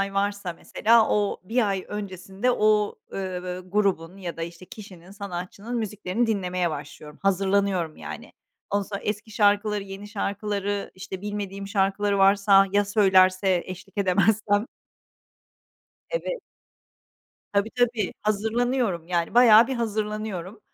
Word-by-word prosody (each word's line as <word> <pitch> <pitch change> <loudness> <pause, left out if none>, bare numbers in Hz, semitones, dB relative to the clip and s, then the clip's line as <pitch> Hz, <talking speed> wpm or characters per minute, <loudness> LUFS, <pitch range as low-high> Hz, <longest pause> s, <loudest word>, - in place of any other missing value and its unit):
ay 195 0 -2
varsa 200 -2 -1
mesela 225 +6 +3
o 205 -1 +1
1 225 +2 +1
ay 195 -2 -2
öncesinde 195 +2 -3
o, 215 -3 +2 0.2
ııı, 185 -1 -4
grubun 190 -3 0
ya 180 -3 -6
da, 165 - -5
işte, 170 +2 -8
kişinin, 195 -7 -12
sanatçının 200 +3 -6
müziklerini 215 0 -1
dinlemeye 180 -5 0
başlıyorum, 150 0 -8
hazırlanıyorum 195 -3 +1
yani. - - -8 0.4
Ondan 205 0 +1
sonra 200 0 -6
eski 210 +1 -3
şarkıları, 205 0 +2
yeni 195 +1 -9
şarkıları, 205 -1 -2
işte 190 0 -7
bilmediğim 200 -1 -5
şarkıları 200 0 +1
varsa, 195 0 +5
ya 205 0 +3
söylerse 190 -2 +4
eşlik 190 +2 -9
edemezsem? 205 +3 +2 1.4
Evet. - - -3 1.1
Tabii, 200 +2 +1
tabii. 240 -5 +1
Hazırlanıyorum 220 -3 0
yani, 170 +1 -1
bayağı 230 -2 +8
bir 265 - -2
hazırlanıyorum, 215 -4 -3
200 Hz, 120 wpm, -25 LUFS, 185-215 Hz, 1.4 s, bayağı